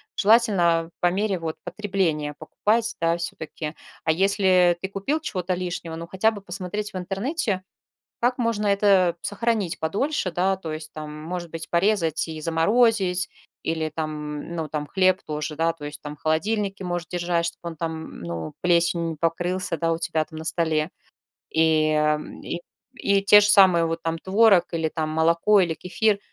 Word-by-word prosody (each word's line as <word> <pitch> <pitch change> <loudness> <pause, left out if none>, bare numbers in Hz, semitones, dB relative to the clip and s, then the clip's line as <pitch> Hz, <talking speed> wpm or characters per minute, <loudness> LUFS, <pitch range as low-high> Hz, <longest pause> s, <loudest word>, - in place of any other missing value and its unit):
Желательно, 210 -4 +4
а, 165 0 -7
по 175 - +3
мере 195 -1 0
вот 160 -1 -4
потребления 180 -6 -1
покупать, 225 +8 0
да, 165 0 +2
всё-таки. 160 -2 -5 0.3
А 160 - +3
если 185 -1 +3
ты 190 - -3
купил 235 +11 -2
чего-то 185 - -2
лишнего, 175 -2 -4
ну, 165 +1 -7
хотя 190 +5 +2
бы 205 -2 -8
посмотреть 195 +2 -4
в 185 - -4
интернете, 200 - -2 0.6
как 245 +2 +1
можно 230 -3 0
это 195 -3 +4
сохранить 210 -4 -1
подольше, 200 - -1
да, 190 +2 +1
то 165 -4 -6
есть 155 0 -6
там, 155 -1 -7
может 175 0 -5
быть, 165 0 -6
порезать 170 -4 +1
и 160 -1 -6
заморозить 185 +3 +2 0.4
или 160 -1 -1
там, 155 -1 -2 0.3
м, 170 - -8
ну, 160 -2 -3
там 150 0 -3
хлеб 185 +3 +2
тоже, 150 0 -4
да, 165 +1 +2
то 150 -3 -11
есть 145 0 -6
там 150 0 -7
в - - -34
холодильнике 195 +4 -1
может 175 -1 -3
держать, 175 -1 0
чтобы 170 0 -5
он 165 - -10
там, 165 +1 -3
м, - - -11
ну, 85 -2 -5
плесенью 170 -1 +2
не 160 - -5
покрылся, 175 +2 -1
да, 165 +1 0
у 165 - -1
тебя 160 -2 0
там 160 - -10
на 160 - -7
столе. 160 -1 0 0.6
И, 160 -1 +3
э, - - +2 0.2
м, 150 - -9
и 170 - -4 0.4
и 200 -4 +2
те 205 +1 +8
же 205 - +3
самые 185 -5 +6
вот 165 0 -3
там 165 0 -2
творог 195 0 +4
или 160 -1 0
там 155 -1 -2
молоко 170 +6 +3
или 170 -2 0
кефир. 205 +4 0
175 Hz, 180 wpm, -24 LUFS, 160-195 Hz, 0.6 s, те